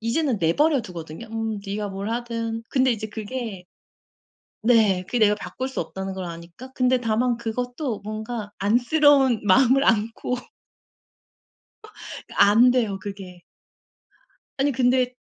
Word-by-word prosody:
이제는 235 +2 0
내버려 265 - +2
두거든요. 175 +2 -9
'음 225 -1 -2
네가 205 +1 -3
뭘 195 +2 -5
하든.' 230 -1 -3
근데 260 -2 +3
이제 220 -1 -5
그게 215 -3 -6 1.0
네 215 -6 +3
그게 245 - -1
내가 210 -1 +4
바꿀 260 +5 -5
수 265 - -4
없다는 190 +3 -5
걸 190 -1 -5
아니까. 170 +9 -10
근데 255 0 +2
다만 235 +1 +1
그것도 245 +2 -4
뭔가 215 0 -5
안쓰러운 260 +3 +3
마음을 260 +7 +5
안고 225 +3 0 2.0
안돼요 225 -1 +4
그게. 190 -3 -9 1.2
아니 280 +1 +2
근데 250 0 +2
225 Hz, 250 characters per minute, -23 LUFS, 205-250 Hz, 2.0 s, 마음을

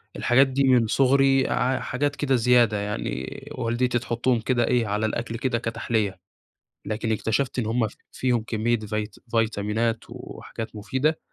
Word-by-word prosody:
الحاجات 135 +3 +4
دي 135 +1 0
من 125 -4 +4
صغري 135 +1 +3
ع 130 +1 +1
حاجات 145 +3 -1
كده 135 -2 +1
زيادة 120 -3 +4
يعني 100 -12 -4
والدتي 120 0 0
تحطهم 120 +1 0
كده 120 0 +1
إيه، 120 -3 +2
على 105 +2 0
الأكل 115 +1 -3
كده 130 -2 0
كتحلية، 110 -4 -2 0.7
لكن 110 +1 -2
اكتشفت 115 +4 0
إن 115 - -1
هم 115 0 +1
ف - - -13 0.2
فيهم 120 -3 0
كمية 115 +1 0
فيت 105 0 -4 0.2
فيتامينات 115 0 0
وحاجات 110 -1 -8
مفيدة، 130 +9 0
120 Hz, 150 wpm, -25 LUFS, 110-130 Hz, 0.7 s, الحاجات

